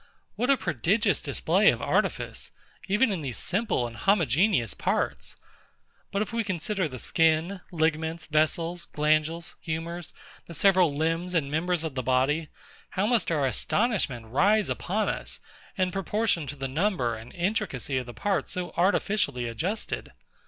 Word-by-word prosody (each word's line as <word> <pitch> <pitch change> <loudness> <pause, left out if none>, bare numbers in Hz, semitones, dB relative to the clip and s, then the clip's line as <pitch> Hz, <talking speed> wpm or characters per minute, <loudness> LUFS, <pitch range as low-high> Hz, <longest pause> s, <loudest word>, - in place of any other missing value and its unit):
What 245 +5 0
a 275 - +5
prodigious 185 - +1
display - - +3
of - - +1
artifice, - - -1 0.4
even 210 +4 +3
in 185 -5 -2
these 130 -5 -4
simple 195 - 0
and 115 -1 -7
homogeneous 170 - +2
parts! - - -2 0.8
But 200 +1 +1
if 215 - -9
we 230 0 +1
consider 190 -1 -1
the 130 -3 -8
skin, 165 +7 +1
ligaments, 160 0 0
vessels, 165 +3 0
glandules, 155 +2 +1
humours, 165 +2 -4 0.4
the 170 - -9
several 185 -4 +4
limbs 165 +4 -1
and 140 -4 +1
members 170 +2 0
of 160 -3 -3
the 130 - -2
body; 135 +5 +1 0.4
how 190 - 0
must 235 0 +2
our 150 -4 +1
astonishment 140 - 0
rise 200 - +3
upon 205 +3 -1
us, - - -4 0.4
in 185 -1 +1
proportion 195 -4 0
to 145 - -5
the 135 -1 -3
number 140 - 0
and 110 +2 -10
intricacy 175 - -1
of 125 - -7
the 120 - -8
parts 190 - -1
so 180 -1 -3
artificially 185 - +1
adjusted! 170 - -3
165 Hz, 150 wpm, -27 LUFS, 145-195 Hz, 0.8 s, a